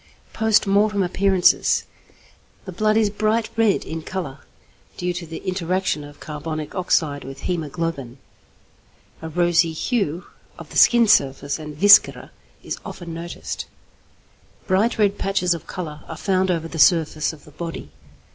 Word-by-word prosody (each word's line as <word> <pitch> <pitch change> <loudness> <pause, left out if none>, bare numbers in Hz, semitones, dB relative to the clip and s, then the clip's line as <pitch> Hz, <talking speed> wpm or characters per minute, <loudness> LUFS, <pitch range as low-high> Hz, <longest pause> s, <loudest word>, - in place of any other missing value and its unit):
Post 220 -1 +3
Mortem 200 0 +2
Appearances. 185 0 +2 0.8
The 190 - -6
blood 215 +4 +1
is 215 -2 +2
bright 215 +2 0
red 225 -3 +2
in 160 0 -5
colour, 155 -6 -6 0.6
due 180 0 -2
to 175 -1 -6
the 165 0 -7
interaction 185 -3 -1
of 145 0 -13
carbonic 155 0 -6
oxide 155 -6 0
with 135 +1 -9
hæmoglobin. 155 -6 -3 1.0
A 160 - -6
rosy 170 0 +2
hue 175 - -2 0.3
of - - -11
the - - -4
skin 235 -1 +6
surface 140 -5 +2
and 150 -1 -8
viscera 205 +4 +5 0.3
is - - -5
often 170 -2 -8
noticed. 170 +1 -6 1.0
Bright 200 +6 +1
red 205 -2 +1
patches 180 -2 +1
of 170 - -8
colour 155 -4 -6
are 160 - -7
found 190 0 0
over 165 -2 -1
the 165 0 -7
surface 155 -2 +3
of 155 -3 -15
the 150 - -15
body. 165 +2 -7
175 Hz, 145 wpm, -22 LUFS, 155-195 Hz, 1.0 s, skin